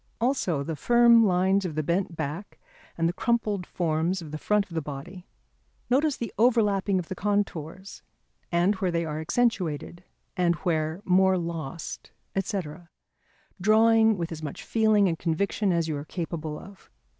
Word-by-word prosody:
Also 225 Hz, -, 0 dB
the 160 Hz, +2 st, -4 dB
firm 235 Hz, -, +5 dB
lines 190 Hz, +2 st, +2 dB
of 170 Hz, -5 st, -4 dB
the 155 Hz, -, -1 dB
bent 175 Hz, +2 st, -1 dB
back 155 Hz, +6 st, -5 dB, 0.4 s
and 165 Hz, 0 st, +2 dB
the 170 Hz, -, -1 dB
crumpled 210 Hz, -4 st, -1 dB
forms 170 Hz, +2 st, -1 dB
of 160 Hz, -4 st, -9 dB
the 155 Hz, -, -5 dB
front 210 Hz, +3 st, +1 dB
of 180 Hz, -, -14 dB
the 160 Hz, -, -1 dB
body. 150 Hz, +6 st, -8 dB, 0.6 s
Notice 285 Hz, +2 st, +2 dB
the 230 Hz, -4 st, -5 dB
overlapping 210 Hz, -5 st, +3 dB
of 180 Hz, -3 st, -3 dB
the -, -, -4 dB
contours, 190 Hz, -2 st, -3 dB, 0.5 s
and 175 Hz, +4 st, +3 dB
where 185 Hz, -1 st, 0 dB
they 170 Hz, -1 st, -1 dB
are 155 Hz, 0 st, -4 dB
accentuated 175 Hz, -, -1 dB, 0.3 s
and 175 Hz, -1 st, +2 dB
where 160 Hz, +1 st, -1 dB
more 190 Hz, +1 st, +4 dB
lost, 165 Hz, -3 st, -5 dB, 0.3 s
&c., 195 Hz, +1 st, -1 dB, 1.0 s
drawing 220 Hz, +1 st, +5 dB
with 170 Hz, -1 st, -3 dB
as 160 Hz, -1 st, -6 dB
much 150 Hz, -3 st, -6 dB
feeling 215 Hz, -3 st, +3 dB
and 165 Hz, -2 st, -2 dB
conviction 185 Hz, +4 st, 0 dB
as 170 Hz, -2 st, +1 dB
you 155 Hz, -, -2 dB
are 145 Hz, -, -6 dB
capable 160 Hz, -3 st, -5 dB
of. 195 Hz, 0 st, -14 dB
180 Hz, 160 wpm, -26 LUFS, 160-205 Hz, 1.0 s, firm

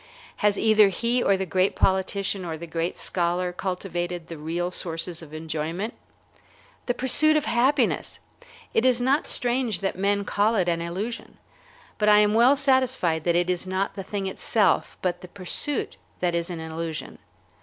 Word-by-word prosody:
Has 205 Hz, -1 st, +2 dB
either 215 Hz, -2 st, +5 dB
he 235 Hz, +6 st, 0 dB
or 200 Hz, -4 st, +3 dB
the 190 Hz, -, -2 dB
great 185 Hz, +2 st, +1 dB
politician 190 Hz, 0 st, 0 dB
or 165 Hz, -2 st, -4 dB
the 170 Hz, -, -8 dB
great 165 Hz, +1 st, -3 dB
scholar 180 Hz, 0 st, -1 dB
cultivated 175 Hz, -2 st, -4 dB
the 165 Hz, -, -7 dB
real 170 Hz, +3 st, -3 dB
sources 170 Hz, -1 st, -3 dB
of 155 Hz, -3 st, -12 dB
enjoyment? 160 Hz, +6 st, -4 dB, 0.9 s
The 245 Hz, -, 0 dB
pursuit 310 Hz, +4 st, +4 dB
of 300 Hz, -, -1 dB
happiness! 260 Hz, +4 st, +1 dB, 0.5 s
It 225 Hz, -, +2 dB
is 255 Hz, -2 st, +3 dB
not 265 Hz, +5 st, +1 dB
strange 240 Hz, -4 st, -1 dB
that 195 Hz, -, -1 dB
men 200 Hz, +1 st, 0 dB
call 210 Hz, +3 st, +1 dB
it 185 Hz, -4 st, +1 dB
an 170 Hz, -1 st, 0 dB
illusion. 195 Hz, +8 st, -5 dB, 0.6 s
But 210 Hz, 0 st, +3 dB
I 210 Hz, -, +7 dB
am 210 Hz, 0 st, +4 dB
well 240 Hz, +5 st, +5 dB
satisfied 260 Hz, -, +1 dB
that 170 Hz, -1 st, +2 dB
it 175 Hz, 0 st, +2 dB
is 180 Hz, 0 st, -2 dB
not 190 Hz, +1 st, -1 dB
the 195 Hz, -, -6 dB
thing 195 Hz, 0 st, -4 dB
itself, 190 Hz, 0 st, +1 dB
but 180 Hz, -1 st, -1 dB
the 180 Hz, -, -9 dB
pursuit, 200 Hz, +10 st, 0 dB, 0.2 s
that 175 Hz, -1 st, 0 dB
is 170 Hz, +1 st, -1 dB
an 175 Hz, -2 st, -5 dB
illusion. 160 Hz, 0 st, -6 dB
190 Hz, 170 wpm, -25 LUFS, 170-225 Hz, 0.9 s, I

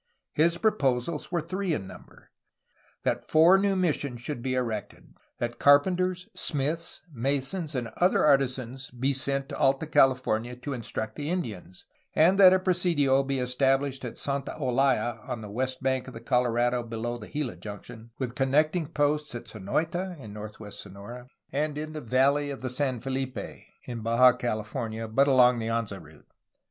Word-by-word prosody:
His 170 Hz, +2 st, +3 dB
proposals 150 Hz, -, 0 dB
were 170 Hz, -1 st, 0 dB
three 185 Hz, +2 st, -2 dB
in 95 Hz, -, -5 dB
number: 95 Hz, -, -14 dB, 0.7 s
that -, -, -1 dB
four 165 Hz, +5 st, +6 dB
new 200 Hz, 0 st, +2 dB
missions 145 Hz, -8 st, -1 dB
should 125 Hz, -1 st, -4 dB
be 130 Hz, +1 st, -1 dB
erected; 115 Hz, -5 st, -4 dB, 0.2 s
that 120 Hz, 0 st, -4 dB
carpenters, 180 Hz, +5 st, +3 dB
smiths, 150 Hz, +2 st, -2 dB
masons, 140 Hz, +6 st, -1 dB
and 120 Hz, -3 st, -2 dB
other 180 Hz, -2 st, +3 dB
artisans 130 Hz, -2 st, +1 dB
be 130 Hz, +3 st, -1 dB
sent 135 Hz, +1 st, 0 dB
to -, -, -5 dB
Alta 135 Hz, +3 st, +2 dB
California 125 Hz, -5 st, +2 dB
to 135 Hz, +3 st, -5 dB
instruct 110 Hz, -2 st, -5 dB
the 145 Hz, +1 st, -3 dB
Indians; 110 Hz, -, -5 dB, 0.3 s
and 180 Hz, +5 st, +5 dB
that 185 Hz, -2 st, +9 dB
a 185 Hz, -, +5 dB
presidio 170 Hz, -7 st, +2 dB
be 135 Hz, 0 st, -2 dB
estabhshed 135 Hz, +1 st, +1 dB
at 120 Hz, -, -6 dB
Santa 140 Hz, -1 st, -3 dB
Olaya 130 Hz, -2 st, +1 dB
(on 115 Hz, -, -3 dB
the 105 Hz, -2 st, -8 dB
west 130 Hz, +4 st, -2 dB
bank 130 Hz, -1 st, 0 dB
of 130 Hz, -, -9 dB
the -, -, -6 dB
Colorado, 120 Hz, 0 st, +1 dB
below 115 Hz, +1 st, -4 dB
the 110 Hz, -3 st, -8 dB
Gila 150 Hz, -5 st, -3 dB
junction), 110 Hz, +2 st, -9 dB
with 125 Hz, -3 st, -3 dB
connecting 150 Hz, +5 st, +1 dB
posts 150 Hz, -2 st, 0 dB
at 120 Hz, -1 st, -7 dB
Sonoita 165 Hz, -, -2 dB
(in 110 Hz, -6 st, -9 dB
northwestern 105 Hz, -2 st, -9 dB
Sonora) 120 Hz, +5 st, -10 dB, 0.2 s
and 150 Hz, +1 st, -1 dB
in 155 Hz, +1 st, -5 dB
the 155 Hz, -, -5 dB
valley 140 Hz, +4 st, +2 dB
of 140 Hz, -, -6 dB
the 130 Hz, -1 st, -3 dB
San 130 Hz, -2 st, -1 dB
FeHpe 130 Hz, +1 st, -5 dB, 0.2 s
(in 120 Hz, -2 st, -6 dB
Baja 120 Hz, +3 st, +5 dB
CaUfornia, 110 Hz, -1 st, -4 dB
but 140 Hz, +4 st, +4 dB
along 125 Hz, -3 st, +5 dB
the 110 Hz, -, -3 dB
Anza 115 Hz, -4 st, -2 dB
route). 80 Hz, -1 st, -17 dB
130 Hz, 165 wpm, -27 LUFS, 120-150 Hz, 0.7 s, that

